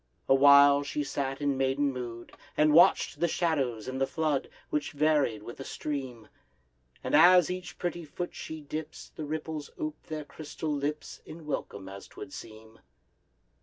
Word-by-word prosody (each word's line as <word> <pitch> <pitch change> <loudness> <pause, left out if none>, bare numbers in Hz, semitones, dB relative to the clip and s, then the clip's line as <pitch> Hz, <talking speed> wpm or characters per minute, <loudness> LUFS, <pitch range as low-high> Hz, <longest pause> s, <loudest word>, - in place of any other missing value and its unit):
Awhile 140 +1 +7
she 145 +1 -3
sat 135 0 -3
in 140 -2 0
maiden 135 +1 +1
mood, 120 -2 -7 0.3
And 150 0 +4
watch'd 170 - +5
the 170 - +2
shadows 140 -10 -1
in 130 0 -4
the 135 - +1
flood, 155 -3 -1 0.2
Which 150 +2 -2
varied 145 -7 +2
with 120 - -9
the 135 - -6
stream: 130 -7 -5 0.8
And - - -3
as 175 +1 +7
each 180 -1 -6
pretty 175 -1 -3
foot 175 +3 -6
she 160 0 -7
dips, 155 +2 -7
The 155 - -5
ripples 155 0 -4
ope 155 0 -4
their 155 -1 -5
crystal 155 +1 -6
lips 145 +1 -4
In 160 0 -11
welcome, 100 -9 -4
as 100 0 -9
'twould 140 +1 -10
seem. 110 0 -11
145 Hz, 160 wpm, -29 LUFS, 135-155 Hz, 0.8 s, Awhile